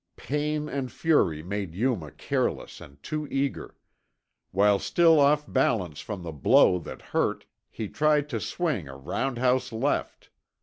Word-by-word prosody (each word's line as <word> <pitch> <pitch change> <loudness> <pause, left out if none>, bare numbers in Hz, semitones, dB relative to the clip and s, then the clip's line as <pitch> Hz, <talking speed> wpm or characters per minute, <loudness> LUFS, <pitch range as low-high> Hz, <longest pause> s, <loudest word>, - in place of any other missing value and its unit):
Pain 150 +1 -2
and 135 -2 -4
fury 90 - +1
made 95 -2 -4
Yuma 105 - -1
careless - - -3
and 70 - -13
too 155 -1 -4
eager. 135 0 -3 0.7
While 100 +1 +3
still 165 - +4
off 150 +1 +4
balance 105 - 0
from 100 -5 -6
the 85 - -5
blow 80 +4 +4
that - - -9
hurt, - - 0 0.2
he 110 - -5
tried 150 +4 +2
to 115 -5 -2
swing 150 - -2
a 65 -1 -9
roundhouse 125 - 0
left. 115 +6 -2
125 Hz, 140 wpm, -27 LUFS, 90-150 Hz, 0.7 s, still